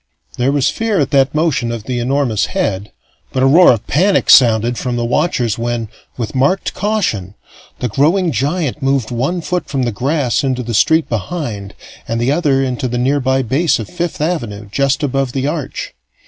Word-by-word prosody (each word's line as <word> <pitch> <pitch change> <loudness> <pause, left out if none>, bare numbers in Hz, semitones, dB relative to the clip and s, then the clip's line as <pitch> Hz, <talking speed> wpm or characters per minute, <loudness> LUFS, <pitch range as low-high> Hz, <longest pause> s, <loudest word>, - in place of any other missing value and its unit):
There 125 +3 +1
was 140 -2 +1
fear 225 -3 -1
at 140 - 0
that 135 0 +2
motion 135 -7 0
of 115 -2 -5
the 125 +1 -3
enormous 125 -3 0
head, 105 - -2 0.4
but 130 - 0
a - - +5
roar 165 +7 +7
of 115 -4 -1
panic 190 +8 +2
sounded 120 -1 +5
from 125 0 -3
the 120 0 -1
watchers 120 -4 0
when, 120 -2 -2 0.3
with 115 -4 -4
marked 140 +9 +1
caution, 175 - -2 0.4
the 125 - -2
growing 165 - +2
giant 145 - -1
moved 135 -4 0
one 135 +9 -1
foot 180 +2 -3
from 135 -2 -1
the 120 - 0
grass 135 +4 0
into 130 -2 -1
the 120 0 -4
street 160 +8 +3
behind 110 - -4 0.3
and 115 0 -2
the 120 +3 +1
other 145 -4 +2
into 130 -1 -2
the 120 0 -3
nearby 130 +1 +1
base 140 +8 +1
of 110 - -6
Fifth 175 -3 -4
Avenue, 120 -11 -3
just 140 +4 0
above 135 -2 -1
the 135 -1 -1
Arch. 150 -1 -4
135 Hz, 185 wpm, -16 LUFS, 120-150 Hz, 0.4 s, roar